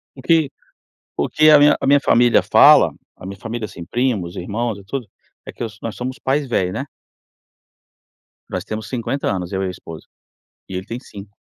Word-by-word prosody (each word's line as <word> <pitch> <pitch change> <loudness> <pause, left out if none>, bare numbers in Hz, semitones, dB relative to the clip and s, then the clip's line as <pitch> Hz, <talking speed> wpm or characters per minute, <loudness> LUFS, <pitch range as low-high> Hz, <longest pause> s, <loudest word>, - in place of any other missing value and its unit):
O 135 - -11
que 160 0 +2 0.7
o 70 - 0
que 155 0 +5
a 150 - +8
minha 145 +1 +5
a - - -3
minha 140 +1 +5
família 120 -2 +4
fala, - - +6 0.2
a - - -13
minha 95 +1 -7
família, 115 +1 -5
assim, 85 -4 -10
primos, 105 -5 -1
irmãos 110 +4 -3
e - - -14
tudo, 120 +4 -5 0.4
é - - -7
que - - -7
os 110 -2 -7
nós 115 -2 -5
somos 130 +1 -5
pais 140 +1 -1
velhos, 95 -6 0
né. 135 - -4 1.7
Nós 90 - -3
temos 110 0 -5
50 130 +2 -3
anos 90 -2 -4
eu 95 0 -1
e 95 - -1
a - - -3
esposa 85 -3 -11 0.6
e 95 - -5
ele 95 +3 -5
tem 115 +2 -5
5. 100 -4 -12
115 Hz, 200 wpm, -20 LUFS, 95-130 Hz, 1.7 s, a